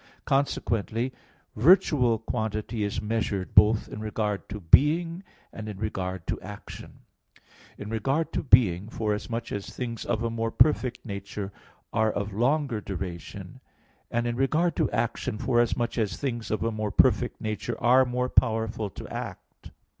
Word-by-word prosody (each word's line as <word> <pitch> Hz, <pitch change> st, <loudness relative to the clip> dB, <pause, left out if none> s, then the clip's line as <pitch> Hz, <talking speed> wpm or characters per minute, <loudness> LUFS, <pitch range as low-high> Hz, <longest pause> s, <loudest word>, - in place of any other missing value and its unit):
Consequently 125 Hz, -3 st, 0 dB, 0.4 s
virtual 135 Hz, -, +5 dB
quantity 110 Hz, 0 st, -3 dB
is 100 Hz, +1 st, -2 dB
measured 105 Hz, -3 st, -2 dB
both 105 Hz, +1 st, +5 dB
in -, -, -8 dB
regard 105 Hz, -2 st, -2 dB
to 105 Hz, +1 st, -5 dB
being 165 Hz, -, +4 dB, 0.3 s
and 110 Hz, -1 st, -6 dB
in 105 Hz, -, -6 dB
regard 95 Hz, -4 st, -3 dB
to -, -, -3 dB
action: 105 Hz, +1 st, -10 dB, 0.8 s
in 105 Hz, -, -7 dB
regard 135 Hz, +9 st, -1 dB
to -, -, 0 dB
being, 105 Hz, -, +4 dB
forasmuch 115 Hz, +2 st, -3 dB
as 100 Hz, -1 st, -4 dB
things 115 Hz, -3 st, -5 dB
of 110 Hz, -, -1 dB
a 115 Hz, -, -1 dB
more 115 Hz, 0 st, -1 dB
perfect 125 Hz, -2 st, +2 dB
nature 100 Hz, -1 st, -5 dB, 0.4 s
are 110 Hz, -1 st, +2 dB
of 100 Hz, 0 st, -3 dB
longer 125 Hz, +1 st, +1 dB
duration; 90 Hz, -4 st, -7 dB, 0.5 s
and 120 Hz, 0 st, 0 dB
in 120 Hz, 0 st, -1 dB
regard 155 Hz, +7 st, +1 dB
to -, -, +1 dB
action, 115 Hz, 0 st, -2 dB
forasmuch 120 Hz, 0 st, +1 dB
as 105 Hz, -3 st, -1 dB
things 120 Hz, -5 st, -3 dB
of 110 Hz, -, -1 dB
a 115 Hz, -, 0 dB
more 110 Hz, -1 st, -2 dB
perfect -, -, +3 dB
nature 110 Hz, +1 st, -3 dB
are 125 Hz, +2 st, +5 dB
more 125 Hz, 0 st, -1 dB
powerful 110 Hz, -3 st, +1 dB
to -, -, -9 dB
act. -, -, -8 dB
110 Hz, 145 wpm, -27 LUFS, 105-125 Hz, 0.8 s, virtual